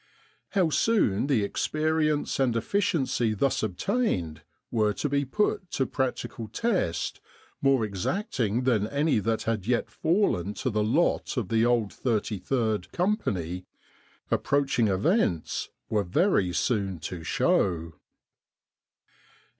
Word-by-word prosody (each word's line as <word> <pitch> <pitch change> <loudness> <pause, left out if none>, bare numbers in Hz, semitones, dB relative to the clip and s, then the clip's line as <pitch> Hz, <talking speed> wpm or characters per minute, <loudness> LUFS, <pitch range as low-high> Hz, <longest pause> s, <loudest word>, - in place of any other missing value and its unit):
How 185 -6 +2
soon 145 - +2
the 130 -8 +2
experience 155 +7 0
and 125 -3 +2
efficiency 130 - 0
thus 135 +6 +1
obtained 90 - -1 0.3
were 105 -2 +2
to 145 - -2
be 140 0 0
put 185 +4 0
to 135 - +1
practical 130 -4 -3
test, 190 - -1 0.4
more 135 -4 +3
exacting 115 - -1
than 110 -5 +2
any 145 0 +1
that 110 +2 -1
had 110 -3 -2
yet 120 -1 0
fallen 130 - +1
to 130 - -2
the 105 0 0
lot 135 +5 +1
of 110 -7 -1
the 115 +1 +3
old 115 -4 +1
33rd 110 -2 -1
Company, 95 - -1 0.6
approaching 140 -5 +2
events 100 - 0 0.2
were 105 -2 +1
very 100 - +2
soon 100 -1 0
to 85 +1 -6
show. 85 -1 +1
115 Hz, 115 wpm, -27 LUFS, 100-150 Hz, 0.6 s, more